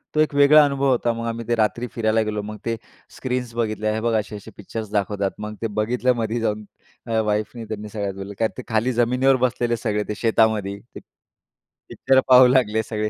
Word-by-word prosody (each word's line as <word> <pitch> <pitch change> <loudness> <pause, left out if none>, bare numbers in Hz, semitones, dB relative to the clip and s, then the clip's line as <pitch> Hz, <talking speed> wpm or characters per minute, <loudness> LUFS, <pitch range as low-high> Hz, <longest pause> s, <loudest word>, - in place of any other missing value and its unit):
तो - - +2
एक 155 -1 +2
वेगळा 145 +2 +7
अनुभव 140 -1 0
होता. 120 -2 +1
मग 115 0 -5
आम्ही 115 0 -5
ते 120 - +1
रात्री 115 +2 0
फिरायला 110 -1 +1
गेलो. 105 -1 -2
मग 105 +1 -7
ते 115 - -1 0.4
स्क्रीन्स 125 -2 -3
बघितल्या 110 -2 -1
हे 110 - -2
बघ 115 0 0
असे-असे 105 -1 -8
पिक्चर्स 110 +1 -6
दाखवतात. 100 -1 -1
मग 105 0 -6
ते 115 - 0
बघितलमध्ये 120 0 0
जाऊन 105 -1 -2 0.4
अ, 115 -1 0
वाईफनी 105 +2 -2
त्यांनी 105 -1 -6
सगळ्यात 100 -2 -4
बोललं 95 +1 -8
कारण 110 -1 +1
ते 130 - -6
खाली 115 +2 +1
जमिनीवर 125 +3 +3
बसलेले 120 -1 -1
सगळे 105 -1 -1
ते 105 - -3
शेतामध्ये 110 -3 +1
ते. - - -20 0.2
पिक्च - - -27 0.8
पिक्चर 130 0 +2
पाहू 125 0 +8
लागले 115 -4 +2
सगळे 105 -1 -3
115 Hz, 195 wpm, -22 LUFS, 105-125 Hz, 0.8 s, पाहू